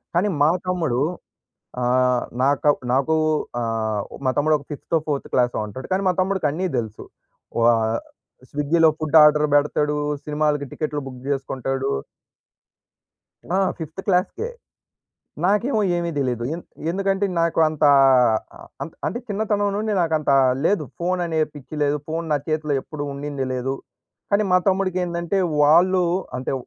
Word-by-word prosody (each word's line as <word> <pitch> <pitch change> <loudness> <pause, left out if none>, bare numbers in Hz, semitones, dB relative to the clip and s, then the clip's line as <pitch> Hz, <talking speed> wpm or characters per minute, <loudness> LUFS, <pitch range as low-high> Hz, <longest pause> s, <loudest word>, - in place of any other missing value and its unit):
కానీ 185 +4 +2
మా 155 - +5 0.2
తమ్ముడు 160 -9 0 0.8
ఆహ్, 125 0 +2 0.2
నాకా 140 +2 +3 0.2
నాకు 135 +4 +2 0.5
ఆహ్, 110 -2 -1 0.2
మా - - +3
తమ్ముడు 155 +1 +3
ఒక 140 - -14
ఫిఫ్తో 155 +3 -1
ఫోర్త్ 145 -2 -2
క్లాసో 125 -1 +2
ఉంటాడు. 130 +6 -8
కానీ 190 +1 +1
మా 185 - +3
తమ్ముడికి 185 -4 +1
అన్నీ 175 +6 -2
తెలుసు. 110 -3 -4 0.6
వా 115 +1 +5 0.8
స్విగ్గీలో 155 +3 +3
ఫుడ్ 155 +1 +3
ఆర్డర్ 150 0 +5
పెడతాడు. 150 +1 +2 0.3
సినిమాలకి 150 -1 0
టికెట్లు 150 -1 -3
బుక్ 130 -1 -9
చేసుకుంటాడు. 135 0 -2 1.7
ఆ! - - +3 0.2
5త్ 160 +2 -6
క్లాస్‌కే. 195 - 0 1.0
నాకేమో 215 +5 +2 0.2
ఏమీ 170 0 -1
దెలీదు! 125 -4 -1
ఎంద్ 170 - -10 0.3
ఎందుకంటే 195 +1 0
నాకు 165 0 +1
అంతా 155 -1 +2 0.7
అ - - -23 0.2
అంత - - -9
అంటే 240 - -2
చిన్నతనం 205 0 0
నుండి 215 0 -1
నాకు 165 -2 0
అంతా 140 -2 +2 0.3
లేదు. 195 -4 +2 0.2
ఫోన్ 180 +1 0
అనే 160 -2 -1
పిచ్చి 145 +1 -10
లేదు. 145 +1 +1
ఫోన్ 165 +1 -3
నా 145 - +3
చేతిలో 155 -2 0
ఎప్పుడూ 145 0 -6
ఉండింది 140 -1 -4
లేదు. 130 +1 -2 0.6
కానీ 200 +1 +3
మా 180 - +6
తమ్ముడికి 185 -1 +1
ఏంటంటే 170 +2 -1 0.2
వాళ్ళు 180 +5 +5 0.3
అంటే 130 - -3
155 Hz, 140 wpm, -22 LUFS, 135-180 Hz, 1.7 s, మా